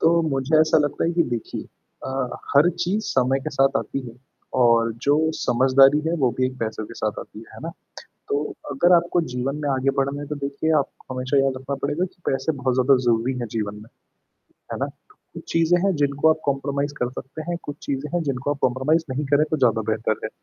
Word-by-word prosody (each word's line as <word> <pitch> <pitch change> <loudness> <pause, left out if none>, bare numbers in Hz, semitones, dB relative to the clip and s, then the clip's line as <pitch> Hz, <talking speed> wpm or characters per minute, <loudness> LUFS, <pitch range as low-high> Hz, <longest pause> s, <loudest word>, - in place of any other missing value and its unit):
तो 170 +1 +4
मुझे 135 +3 +1
ऐसा 155 0 +4
लगता 145 -1 0
है 170 - +1
कि 170 0 +3
देखिए 115 - -5 0.4
अ, - - -4 0.5
हर 155 +5 +6
चीज़ 205 +5 0
समय 130 +1 +2
के 155 - -4
साथ 135 -1 +2
आती 140 - -4
है 115 - -13 0.5
और 115 -1 +4
जो 145 - +5 0.3
समझदारी 135 +3 +5
है, - - -1
वो 130 -6 +2
भी 130 - +3
एक 130 0 -7
पैसों 110 -1 -3
के 115 - -11
साथ 105 -3 -2
आती - - -11
है। - - -11
है - - -11
ना? - - -4 0.6
तो 140 - +1 0.3
अगर 175 +6 +4
आपको 175 +1 +1
जीवन 130 +3 -2
में 145 - -1
आगे 135 0 +1
बढ़ना 140 +1 0
है - - -6
तो 150 - -3
देखिए 140 +3 -1
आपको 135 -1 -5
हमेशा 130 +2 0
याद 135 0 +3
रखना 135 +2 -4
पड़ेगा 150 +5 0
कि 180 - -11
पैसे 135 +4 0
बहुत 130 -1 +1
ज़्यादा 130 +1 +4
ज़रूरी 120 +2 +2
हैं 120 - -3
जीवन 105 -1 -2
में। 105 +2 -12 0.9
है - - -3
ना? - - 0 0.5
कुछ - - -9
चीज़ें 165 +1 +4
हैं 195 - +2
जिनको 140 +2 +3
आप 160 - +2
कॉम्प्रोमाइज़ 140 +1 -1
कर 125 - +1
सकते 135 +4 -7
हैं, 175 - -1
कुछ 145 - -6
चीजें 140 +1 -3
हैं 175 - +1
जिनको 140 -1 -2
आप 145 - -2
कॉम्प्रोमाइज़ 130 +6 +2
नहीं 140 +3 -2
करें 145 +1 +5
तो 155 - +1
ज़्यादा 115 -5 +3
बेहतर 110 0 -1
है। - - -3
135 Hz, 220 wpm, -23 LUFS, 130-150 Hz, 0.9 s, हर